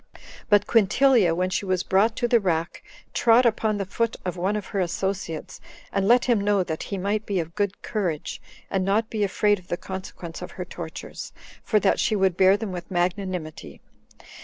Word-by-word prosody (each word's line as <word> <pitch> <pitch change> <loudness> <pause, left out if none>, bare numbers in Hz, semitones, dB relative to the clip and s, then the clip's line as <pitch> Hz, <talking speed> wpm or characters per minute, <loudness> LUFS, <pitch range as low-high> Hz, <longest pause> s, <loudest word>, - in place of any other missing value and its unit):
But 205 -1 +5
Quintilia, 225 -3 +4
when 185 +1 0
she - - -1
was 185 -2 0
brought 210 +4 +2
to 240 - 0
the 235 0 +4
rack, 170 -4 -2 0.3
trod 235 +2 +5
upon 220 -2 +1
the 200 - -2
foot 230 +4 -1
of 180 - -2
one 185 +4 0
of 210 -2 -3
her 200 - 0
associates, 180 -2 -3 0.3
and 195 -1 +1
let 240 +2 +5
him 235 -5 +2
know 200 -1 +2
that 160 -2 -4
he 200 - -4
might 205 +3 -1
be 200 -3 -1
of 165 0 -4
good 200 0 -2
courage, 180 -9 -3 0.3
and 190 -1 +1
not 210 +4 +1
be 215 -2 0
afraid 205 +1 +2
of 180 - -20
the 175 - -2
consequence 185 -3 -7
of - - -6
her - - -5
tortures, - - -8 0.3
for 215 - +2
that - - +2
she 215 - +2
would 190 -3 +2
bear 190 +2 +5
them 205 -2 -5
with 175 -1 -7
magnanimity. 180 -3 -3
195 Hz, 195 wpm, -25 LUFS, 180-215 Hz, 0.3 s, But